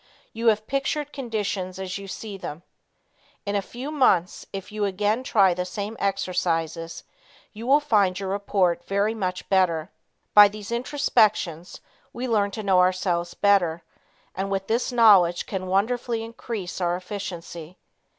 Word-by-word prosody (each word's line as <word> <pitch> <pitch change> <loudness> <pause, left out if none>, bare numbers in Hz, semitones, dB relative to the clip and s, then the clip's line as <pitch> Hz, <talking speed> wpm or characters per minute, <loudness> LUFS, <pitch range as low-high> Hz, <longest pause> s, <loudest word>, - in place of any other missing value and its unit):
You 230 +1 -2
have 215 -1 +3
pictured 280 +3 -2
conditions 205 -7 -3
as 190 0 -5
you 200 - -9
see 205 +1 -7
them. 170 -3 -7 0.8
In 200 0 -2
a 200 - +2
few 250 +8 -7
months, 195 - +2
if 195 0 -7
you 215 0 -3
again 205 +4 0
try 195 -7 +4
the 180 +1 -2
same 200 +4 -5
exercises, 170 -4 -2 0.5
you 225 +3 -8
will 280 +3 +6
find 205 -10 +2
your 195 -1 -4
report 190 -3 0
very 200 +2 0
much 185 -4 -3
better. 180 -3 +1 0.4
By 205 0 +10
these 210 +1 -8
introspections, 220 - +1 0.3
we 250 +2 -4
learn 210 -4 +2
to 215 +2 -6
know 190 -2 +3
ourselves 180 -1 +1
better 175 -5 +2 0.5
and 195 +1 -3
with 195 -1 -2
this 235 +5 0
knowledge 200 -8 +5
can 185 -1 -4
wonderfully 225 +4 0
increase 225 -5 -6
our 175 0 +1
efficiency. 180 -3 -7
200 Hz, 150 wpm, -24 LUFS, 180-220 Hz, 0.8 s, By